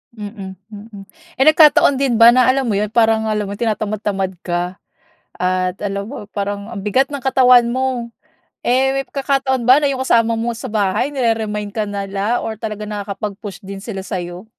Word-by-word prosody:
Mm, 200 Hz, -3 st, -8 dB
mm. 205 Hz, -2 st, -12 dB, 0.3 s
Eh, 265 Hz, -, +4 dB
nagkataon 305 Hz, -3 st, +6 dB
din 260 Hz, -4 st, 0 dB
ba 235 Hz, +2 st, +8 dB
na 255 Hz, -, +5 dB
alam 265 Hz, -2 st, -1 dB
mo 210 Hz, -, 0 dB
'yon, 210 Hz, +1 st, -1 dB
parang 225 Hz, -1 st, +2 dB
alam 210 Hz, -1 st, -1 dB
mo 200 Hz, -, -5 dB
tinatamad-tamad 205 Hz, -3 st, -2 dB
ka? 175 Hz, +1 st, -2 dB, 0.6 s
At 185 Hz, +1 st, -1 dB
alam 200 Hz, 0 st, -3 dB
mo, 265 Hz, -, -8 dB
parang 200 Hz, +1 st, -4 dB
ang 215 Hz, -4 st, -6 dB
bigat 255 Hz, +7 st, +1 dB
ng 285 Hz, -2 st, -5 dB
katawan 250 Hz, -2 st, +5 dB
mo. 255 Hz, -2 st, -2 dB, 0.6 s
Eh, 260 Hz, +2 st, +3 dB
may 270 Hz, 0 st, -2 dB
pagkakataon 270 Hz, -2 st, -1 dB
ba 255 Hz, +4 st, +6 dB
na 295 Hz, -, +1 dB
'yong 265 Hz, -2 st, -1 dB
kasama 230 Hz, -2 st, +2 dB
mo 230 Hz, +1 st, -2 dB
sa 235 Hz, +2 st, -6 dB
bahay 215 Hz, +5 st, -1 dB
nire-remind 220 Hz, -4 st, -1 dB
ka 215 Hz, 0 st, -3 dB
nila 200 Hz, +3 st, -2 dB
or 220 Hz, -1 st, -5 dB
talaga 215 Hz, -2 st, -5 dB
nakakapag-push 205 Hz, -1 st, -6 dB
din 195 Hz, 0 st, -8 dB
sila 195 Hz, -1 st, -6 dB
sa'yo? 180 Hz, 0 st, -6 dB
220 Hz, 175 wpm, -18 LUFS, 200-250 Hz, 0.6 s, ba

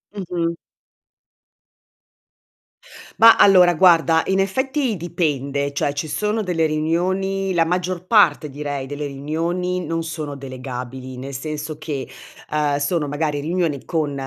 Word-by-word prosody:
Mh-mh. 170 Hz, -3 st, -2 dB, 2.6 s
Ma, 230 Hz, 0 st, +9 dB
allora, 180 Hz, -3 st, +6 dB
guarda, 165 Hz, -2 st, +5 dB
in 190 Hz, 0 st, +1 dB
effetti, 260 Hz, +4 st, 0 dB
dipende, 140 Hz, -5 st, -2 dB
cioè, 145 Hz, 0 st, 0 dB
ci 145 Hz, +2 st, -3 dB
sono 210 Hz, +8 st, -1 dB
delle 165 Hz, -4 st, +1 dB
riunioni 185 Hz, +5 st, -1 dB
la 165 Hz, -1 st, +3 dB
maggior 180 Hz, +1 st, -2 dB
parte, 205 Hz, -7 st, +4 dB
direi, 145 Hz, -1 st, -5 dB
delle 145 Hz, +1 st, -5 dB
riunioni, 170 Hz, +6 st, -2 dB
non 165 Hz, 0 st, -2 dB
sono 155 Hz, -3 st, -5 dB
delegabili, 130 Hz, -1 st, -7 dB
nel 135 Hz, +2 st, -7 dB
senso 150 Hz, +2 st, -5 dB
che, 145 Hz, -4 st, -4 dB, 0.4 s
ehm, 150 Hz, -2 st, +1 dB
sono 150 Hz, +1 st, -1 dB
magari 145 Hz, 0 st, -1 dB
riunioni 160 Hz, -2 st, -1 dB
con 155 Hz, -4 st, -1 dB
160 Hz, 120 wpm, -21 LUFS, 145-180 Hz, 2.6 s, Ma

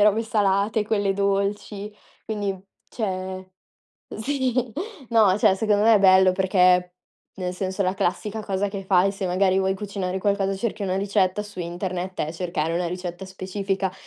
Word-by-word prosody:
le -, -, +6 dB
robe 210 Hz, +2 st, +3 dB
salate, 210 Hz, -1 st, +1 dB
quelle 205 Hz, -3 st, +1 dB
dolci. 200 Hz, +1 st, -1 dB, 0.3 s
Quindi, 205 Hz, -3 st, -2 dB, 0.3 s
cioè, 185 Hz, -3 st, -4 dB, 0.6 s
uhm, -, -, -7 dB
sì, 255 Hz, -3 st, -1 dB, 0.4 s
no, 215 Hz, -5 st, +5 dB
cioè 190 Hz, -, +4 dB
secondo 205 Hz, +1 st, +1 dB
me 225 Hz, 0 st, +7 dB
è -, -, +6 dB
bello 190 Hz, -1 st, +6 dB
perché, 180 Hz, -1 st, +3 dB, 0.4 s
nel 180 Hz, -1 st, -3 dB
senso, 190 Hz, +1 st, -2 dB
la 185 Hz, 0 st, 0 dB
classica 205 Hz, +3 st, -2 dB
cosa 200 Hz, 0 st, -1 dB
che 195 Hz, -1 st, -5 dB
fai, 190 Hz, 0 st, +3 dB
se 195 Hz, -1 st, -4 dB
magari 185 Hz, +1 st, +2 dB
vuoi 190 Hz, 0 st, +1 dB
cucinare 190 Hz, -2 st, -3 dB
qualcosa, 195 Hz, 0 st, 0 dB
cerchi 210 Hz, 0 st, -3 dB
una 185 Hz, -1 st, -1 dB
ricetta 200 Hz, 0 st, +1 dB
su 200 Hz, -3 st, -8 dB
internet 180 Hz, +1 st, -4 dB
è 155 Hz, +2 st, -2 dB
cercare 170 Hz, -2 st, -2 dB
una 175 Hz, 0 st, 0 dB
ricetta 180 Hz, +1 st, -5 dB
specifica. 190 Hz, 0 st, -3 dB
195 Hz, 160 wpm, -24 LUFS, 185-205 Hz, 0.6 s, me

